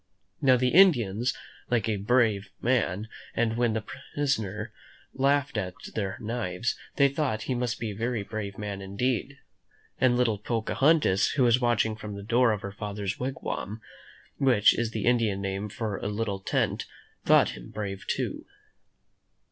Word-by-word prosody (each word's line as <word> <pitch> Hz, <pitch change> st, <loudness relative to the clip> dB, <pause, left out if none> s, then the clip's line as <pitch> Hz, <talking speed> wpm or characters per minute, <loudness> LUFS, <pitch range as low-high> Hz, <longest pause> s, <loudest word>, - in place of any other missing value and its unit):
Now, 130 Hz, -2 st, +5 dB
the 125 Hz, +1 st, +2 dB
Indians 125 Hz, -, +4 dB, 0.4 s
like 115 Hz, -3 st, +1 dB
a 110 Hz, -2 st, 0 dB
brave 105 Hz, -1 st, +2 dB
man, 110 Hz, -4 st, 0 dB, 0.3 s
and 115 Hz, -1 st, +1 dB
when 120 Hz, -1 st, +2 dB
their 110 Hz, 0 st, -2 dB, 0.3 s
prisoner 110 Hz, -7 st, -1 dB, 0.4 s
laughed 140 Hz, -2 st, +1 dB
at 90 Hz, -2 st, -4 dB, 0.2 s
their 100 Hz, -3 st, -2 dB
knives, 110 Hz, -2 st, -2 dB, 0.2 s
they 140 Hz, -, +5 dB
thought 135 Hz, -6 st, -1 dB
he 130 Hz, -, -1 dB
must 120 Hz, -1 st, -2 dB
be 115 Hz, -2 st, -3 dB
a -, -, -7 dB
very 115 Hz, 0 st, -1 dB
brave 100 Hz, -1 st, -5 dB
man 100 Hz, -2 st, -5 dB
indeed. 125 Hz, +7 st, -2 dB, 0.6 s
And 125 Hz, -2 st, +4 dB
little 115 Hz, -5 st, +2 dB
Pocahontas, 115 Hz, -, +2 dB
who 135 Hz, -, +2 dB
was 120 Hz, +1 st, +4 dB
watching 115 Hz, -2 st, +2 dB
from 105 Hz, -1 st, -7 dB
the 100 Hz, -, -7 dB
door 120 Hz, +2 st, +3 dB
of 105 Hz, -2 st, -2 dB
her 100 Hz, -, -4 dB
father's 100 Hz, -1 st, -4 dB
wig 130 Hz, +1 st, -4 dB
wam, 105 Hz, +3 st, -4 dB, 0.6 s
which 120 Hz, -7 st, +5 dB
is 120 Hz, -1 st, 0 dB
the 110 Hz, -2 st, -3 dB
Indian 115 Hz, -5 st, +2 dB
name 100 Hz, +1 st, -3 dB
for 105 Hz, -2 st, -3 dB
a -, -, -4 dB
little 105 Hz, -1 st, -2 dB
tent, 95 Hz, -, -1 dB, 0.4 s
thought -, -, +5 dB
him -, -, -9 dB
brave 100 Hz, -2 st, -5 dB
too. -, -, -2 dB
110 Hz, 160 wpm, -27 LUFS, 100-125 Hz, 0.6 s, Now